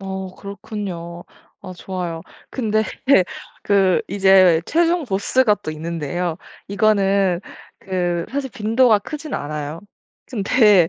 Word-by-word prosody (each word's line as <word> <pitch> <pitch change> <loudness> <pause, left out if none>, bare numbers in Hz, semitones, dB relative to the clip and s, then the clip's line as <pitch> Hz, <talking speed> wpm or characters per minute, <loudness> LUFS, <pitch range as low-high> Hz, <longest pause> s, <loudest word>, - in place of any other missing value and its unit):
어. 190 -1 -6
그렇군요. 195 -4 -7 0.4
아 185 - -8
좋아요. 175 -3 -5 0.3
근데 220 -4 0 0.8
그 195 -2 +3
이제 190 -3 +5
최종 340 +1 +2
보스가 210 +2 +2
또 155 - -6
있는데요. 165 +2 -3 0.3
이거는 200 -3 +2 0.4
그 175 -3 -2
사실 270 0 -3
빈도가 225 +1 +3
크진 300 +6 -6
않아요. 150 +2 -4 0.5
근데 205 -5 +4
195 Hz, 220 characters per minute, -20 LUFS, 175-215 Hz, 0.8 s, 이제